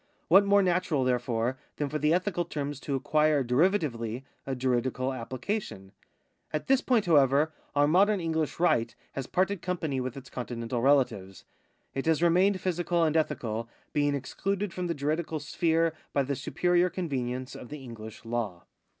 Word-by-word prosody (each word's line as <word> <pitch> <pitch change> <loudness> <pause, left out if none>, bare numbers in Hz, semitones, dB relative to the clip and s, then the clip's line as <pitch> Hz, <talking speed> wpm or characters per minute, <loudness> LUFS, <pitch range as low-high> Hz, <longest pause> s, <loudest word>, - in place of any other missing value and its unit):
What 195 +4 +8
more 200 0 +5
natural, 175 -6 +1
therefore, 125 0 0 0.2
than 145 - -1
for 150 +2 -3
the 150 +1 +2
ethical 180 0 +1
terms 145 -4 -4
to 140 - -3
acquire 150 +1 +2
derivatively 125 - +1 0.2
a 135 - -1
juridical 130 +1 0
application? 130 - -4 0.6
At 155 - -2
this 265 -1 +3
point, 235 -5 +2
however, 150 -1 +4 0.2
our 145 0 +4
modern 195 +6 +4
EngUsh 160 -3 -1
right 115 -10 +2 0.2
has 135 -2 -5
parted 190 0 0
company 160 -7 -2
with 130 +1 -4
its 135 -1 -10
Continental 120 -1 -3
relatives. 115 -9 +1 0.5
It 135 +3 -3
has 160 +1 +3
remained 185 +3 +4
physical 175 -2 0
and 155 -1 +1
ethical, 115 -7 -1 0.2
being 145 -1 +2
excluded 195 +8 -2
from 180 -1 -3
the 170 - -1
juridical 155 +2 -1
sphere 165 +2 +1 0.2
by 140 - +2
the 140 +1 -2
superior 175 +6 +1
convenience 130 -8 -3
of 125 - -9
the 145 -3 -8
EngUsh 110 -1 -9
Imv. 115 -7 -3
145 Hz, 160 wpm, -28 LUFS, 125-175 Hz, 0.6 s, What